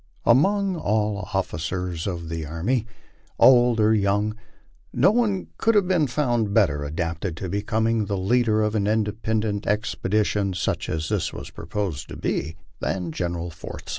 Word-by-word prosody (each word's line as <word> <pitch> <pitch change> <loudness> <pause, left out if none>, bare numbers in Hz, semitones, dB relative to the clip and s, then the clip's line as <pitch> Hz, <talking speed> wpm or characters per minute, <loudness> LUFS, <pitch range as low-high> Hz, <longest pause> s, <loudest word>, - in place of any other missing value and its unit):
Among 195 - +3
all 105 -5 0
the - - -8
officers 90 0 -3
of 85 -3 -4
the 80 -1 -3
army, 95 - -1 0.5
old 120 -2 +6
or 110 +1 +4
young, 105 +1 +1 0.6
no 190 - +4
one 215 -5 0
could 225 0 +3
have 200 -3 +4
been 175 -6 +2
found 120 -6 0
better 75 -10 +3
adapted 80 +3 -3
to 95 - -4
become 110 +2 0
the 100 - -1
leader 110 +2 +2
of 105 0 0
an 105 -2 0
independent 110 -1 -1
expedition, 105 -2 0
such 85 - -2
as 80 0 -2
this - - 0
was - - -8
proposed 90 -9 -4
to - - -7
be, 80 +3 -2 0.2
than 90 -3 -2
General 85 0 -3
Forsyth. 80 -1 -9
105 Hz, 155 wpm, -24 LUFS, 90-115 Hz, 0.6 s, old